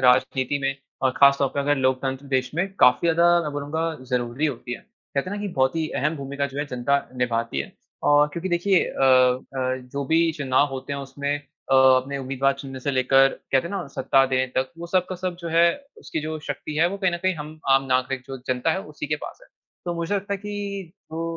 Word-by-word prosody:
राजनीति 130 +2 +3
में 135 0 0 0.3
और 130 - +4
खास 140 0 +7
तौर 140 - +2
पे 140 - 0
अगर 145 +1 +2
लोकतंत्र 130 +1 -1
देश 130 -1 0
में 175 +4 +1
काफ़ी 125 +7 +5
ज़्यादा 170 +1 +4
मैं 150 -2 -4
बोलूँगा 145 +3 -3 0.3
ज़रूरी 125 +4 0
होती 120 -3 -4
है। - - -6 0.3
कहते 140 +7 -1
है 205 - -3
ना - - -5
कि 205 - -2
बहुत 130 +3 +2
ही 160 -1 -1
अहम 150 +3 0
भूमिका 140 0 -3
जो 140 +1 -8
है 145 - 0
जनता 130 +2 +1 0.2
निभाती 115 - -1
है। 70 - -6 0.4
और 145 0 +5
क्योंकि 170 +4 -3
देखिए 175 +2 +3
अ - - -4
अ, 130 0 +3 0.2
जो 140 0 -2
भी 165 +3 +3
चुनाव 140 -2 +2
होते 135 +1 -5
हैं 140 - -3
उसमें 140 +1 -4
अ, 145 -2 -5
अपने 130 +1 +4
उम्मीदवार 135 +1 0
चुनने 135 -2 -7
से 140 - -1
लेकर 135 +1 +4
कहते 135 +2 -1
है - - -9
ना 185 -6 -3
सत्ता 135 0 +4
देने 130 0 +1
तक, 130 0 +1
वो 170 - -6
सब 180 0 +1
का 185 - -5
सब 180 -1 -3
जो 170 - -5
है 165 +1 +4 0.4
उसकी 160 - -4
जो 155 +1 -4
शक्ति 155 - -4
है 165 +2 +4
वो 200 - -4
कहीं 190 -3 +1
न - - 0
कहीं 185 -1 +2
हम 155 0 -8
आम 135 0 +5
नागरिक 130 0 0
जो 135 -1 -6
जनता 125 -1 +1
है 190 - -2
उसी 150 - -4
के 150 - 0
पास - - -10
है। - - -18 0.4
तो 175 -1 -2
मुझे 170 +4 -2
लगता 200 0 -2
है - - -5
कि 200 -3 -5 0.2
वो 165 +1 -3
140 Hz, 235 wpm, -24 LUFS, 130-165 Hz, 0.4 s, खास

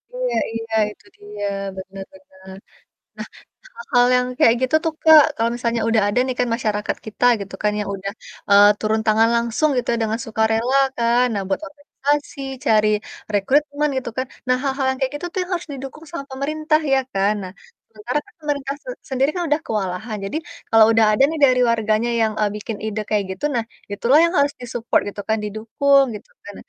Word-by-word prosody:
Iya - - -2 0.2
iya, 225 0 -6 0.2
itu - - -19
dia. 205 0 -6 0.3
Benar 195 +1 -8
benar. 190 0 -15 0.6
Nah, - - -6 0.5
hal-hal 245 - +2
yang 250 0 +1
kayak 230 - +6
gitu 260 +4 +1
tuh, 325 - 0
Kak, 315 -2 +9
kalau 230 0 +1
misalnya 235 -1 -1
udah 225 -1 +3
ada 220 +5 +1
nih 255 -1 -3
kan - - +2
masyarakat 210 -3 -2
kita 220 +3 -2 0.2
gitu 195 -1 -7
kan 210 - +3
yang 205 - -3
udah, 195 +1 -5 0.4
eee, 200 0 +8
turun 220 0 0
tangan 220 +1 +4
langsung 235 +6 +1
gitu 245 - -1
ya, - - 0
dengan 220 +1 -2
sukarela 225 +4 +1 0.2
kan, 235 +1 +3
nah 200 - -1
buat 195 - -1
organisasi, 285 0 -3 0.2
cari 215 -1 +4 0.5
rekrutmen, 290 +8 +1
gitu 255 - -3
kan. 260 - 0 0.2
Nah, 255 0 +3
hal-hal 270 -1 -1
yang 265 - -5
kayak 265 +1 -1
gitu 320 - -7
tuh 380 - -2
yang 360 - -10
harus 350 -1 -3
didukung 275 +4 -9
sama 335 -5 -5
pemerintah 305 +3 0
ya 270 - +4
kan. 195 +2 +1
Nah, 185 0 -8 0.4
sementara 225 +6 -3
kan - - -22
pemerintah 285 -3 -3
sen - - -5 0.2
sendiri 265 +2 +2
kan 355 - -1
udah 295 - +3
kewalahan, 210 +1 -3
jadi 195 - -3 0.3
kalau 225 -1 +7
udah 225 -1 +5
ada - - +4
nih 320 0 -4
dari 255 -2 +3
warganya 220 +1 0
yang, 220 -1 +1
eee, 210 -1 +2
bikin 210 +1 -6
ide 215 0 -3
kayak 210 -2 +1
gitu, 290 - -3
nah, 235 - 0 0.3
itu 205 - -6
lah 295 - +7
yang 340 - -1
harus 285 0 +2
di-support 240 -1 0
gitu 205 - -7
kan, 220 - +2
didukung 270 +7 +2
gitu 205 - -11 0.2
kan. 205 - -9
235 Hz, 195 wpm, -21 LUFS, 215-275 Hz, 0.6 s, Kak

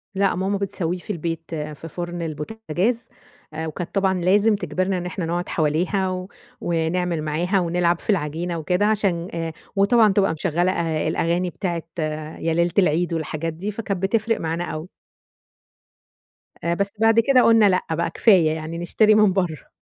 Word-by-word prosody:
لأ، 195 0 +2
ماما 190 +2 0
بتسويه 185 -3 -2
في 180 - -15
البيت 165 -3 -4
في 150 +1 -6
فرن 175 +1 -5
البوتجاز، 185 +7 -2 0.5
وكانت 160 +3 -5
طبعًا 190 -1 +2
لازم 205 +5 +4
تجبرنا 185 +1 -1
إن 180 - -4
إحنا 180 -1 -3
نقعد 175 +2 -2
حواليها، 185 +4 0 0.3
ونعمل 170 0 0
معاها 170 +6 0
ونلعب 175 -1 +1
في - - -12
العجينة 170 -2 -1
وكده، 180 +5 +1
عشان 195 -5 +1
آآ 165 -1 -3 0.2
وطبعًا 205 +1 +4
تبقى 195 -3 +2
مشغّلة 170 +3 0
أ 165 -3 -1
الأغاني 175 +2 0
بتاعة 170 -2 -3 0.6
يا 165 - 0
ليلة 170 +1 +2
العيد 175 -1 +2
والحاجات 160 0 -3
دي، 190 +6 -4
فكانت 200 -3 -4
بتفرق 225 +3 +1
معانا 165 +1 -2
أوي. 155 -1 -5 1.8
آآ 170 - +1
بس 200 +3 -1
بعد 225 0 +5
كده 255 +2 +5
قلنا 225 -3 +6
لأ، 185 -1 +2
بقى 170 +1 0
كفاية 180 -8 +4
يعني 160 +1 -5
نشتري 210 +5 +3
من 210 -3 +5
برّه. 175 -6 -2
175 Hz, 155 wpm, -22 LUFS, 165-195 Hz, 1.8 s, قلنا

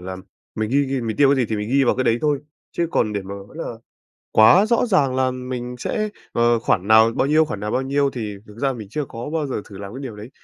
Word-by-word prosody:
là 95 +1 -6 0.4
mình 110 0 -2
ghi 140 +2 +3
ghi 135 -1 -2
mình 115 -2 -3
tiêu 140 -1 +5
cái - - -3
gì 125 -3 +1
thì 110 - -1
mình 105 +1 -3
ghi 135 0 +4
vào - - +3
cái 130 - 0
đấy 115 0 +2
thôi, 150 -2 +1 0.3
chứ 170 - 0
còn 105 -2 +1
để 100 -1 -2
mà 100 +1 -7
nói 100 +8 -11
là 165 - -4 0.7
quá 180 - +6
rõ 235 +1 +2
ràng 145 - +2
là 130 0 +2
mình 125 -1 -5
sẽ, 215 - -2 0.2
ờ, 120 0 +3
khoản 100 -3 0
nào 110 +1 +7
bao - - +2
nhiêu, 155 +2 +4
khoản 105 -10 -5
nào 105 +1 -3
bao 130 - 0
nhiêu, 140 +1 +1
thì 110 -5 -5
thực 105 +2 -14
ra 135 -1 +1
mình 110 -5 -8
chưa 145 +7 -3
có 120 +4 -7
bao 155 -3 -1
giờ 130 - -3
thử 100 -2 -12
làm 100 0 -8
cái 130 - -7
điều 115 -6 -7
đấy. 110 +5 -10
125 Hz, 280 wpm, -21 LUFS, 110-140 Hz, 0.7 s, nào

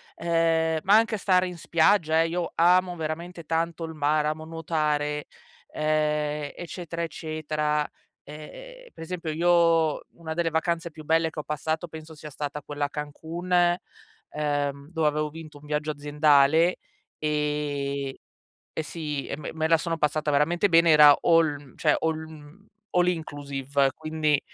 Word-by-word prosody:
ehm, 165 -1 +1
ma 200 +2 +5
anche 225 0 +3
a - - -3
stare 185 -2 +2
in 180 -1 -7
spiaggia, 160 -1 +3
ehm, 165 - -1
io 175 -1 -2
amo 180 +1 +4
veramente 170 +2 -5
tanto 165 +1 -1
il 160 0 -5
mare, 150 0 +1
amo 155 +1 -5
nuotare, 150 -2 -1 0.5
ehm, 150 -1 0
eccetera, 170 -1 -6
eccetera, 155 -2 -2 0.4
ehm, - - -11
per - - -9
esempio, 165 -2 -4
io 165 -1 +3
una 160 -1 -6
delle 165 0 0
vacanze 165 +1 -1
più 155 0 -11
belle 160 +1 +2
che 160 - -8
ho - - -4
passato 155 +3 -3
penso 160 0 -10
sia 150 0 -9
stata 145 0 -5
quella 145 0 -3
a - - -4
Cancun, 160 +5 -6 0.8
ehm, 145 -1 -2
dove 160 -3 +1
avevo 150 0 0
vinto 155 -1 -11
un 145 - -16
viaggio 150 +1 -1
aziendale, 150 +3 +3 0.4
ehm, 145 -2 -2 0.7
e - - +1
sì, 150 -2 -4
e - - -4
me 150 - -7
me 160 0 -1
la 165 +1 +5
sono 165 0 -3
passata 150 0 0
veramente 165 +7 +2
bene, 165 -1 +5
era 150 -1 +9
all 165 -3 +3
mhmm, 140 -3 -17
cioè 150 -2 +2
all 160 -1 0
mhmm, 160 +4 -12 0.2
all 180 0 +3
inclusive, 140 -4 -1
quindi, 155 -1 0
155 Hz, 155 wpm, -26 LUFS, 150-165 Hz, 0.8 s, era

